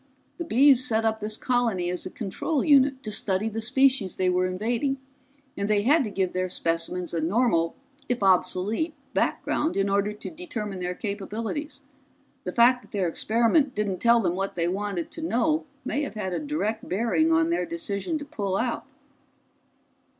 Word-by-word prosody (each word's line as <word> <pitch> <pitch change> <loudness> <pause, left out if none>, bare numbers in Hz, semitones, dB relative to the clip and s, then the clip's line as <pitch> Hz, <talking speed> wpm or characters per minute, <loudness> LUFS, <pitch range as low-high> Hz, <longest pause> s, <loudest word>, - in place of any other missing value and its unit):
"The 340 - -4
Bees 265 -1 +5
set 225 -2 +2
up 220 0 +1
this 215 +1 -3
colony 230 -8 0
as 180 +1 -3
a - - -6
control 240 - -2
unit 275 -2 +4
to 215 - -4
study 205 +1 0
the 225 +1 -4
species 255 -3 +2
they 185 -1 +1
were 180 0 +2
invading, 235 +9 -1 0.6
and 200 +1 -2
they 205 -1 +2
had 290 +5 +4
to - - -3
give 190 -2 -1
their 185 0 -1
specimens 170 +1 -2
a 165 - 0
normal 170 -2 +1 0.3
if 245 -4 -1
obsolete 195 - +1 0.2
background 310 -5 0
in 195 0 +1
order 200 +1 +1
to 210 - -8
determine 230 - -5
their 180 0 -3
capabilities. 215 - -4 0.6
The - - -2
fact 245 +1 +5
that - - -19
their 195 -4 0
experiment 235 - +2
didn't 200 -3 -1
tell 235 0 +5
them 175 -4 0
what 195 +1 -3
they 170 -1 0
wanted 190 -2 -3
to 330 - -8
know 315 +2 0 0.2
may 285 - -1
have 280 - -4
had 190 -4 -3
a - - -1
direct 290 -8 -3
bearing 235 - +2
on 325 0 +3
their 340 - 0
decision 315 - -2
to 290 - -7
pull 200 -10 -2
out." 240 0 -2
220 Hz, 180 wpm, -26 LUFS, 190-270 Hz, 0.6 s, Bees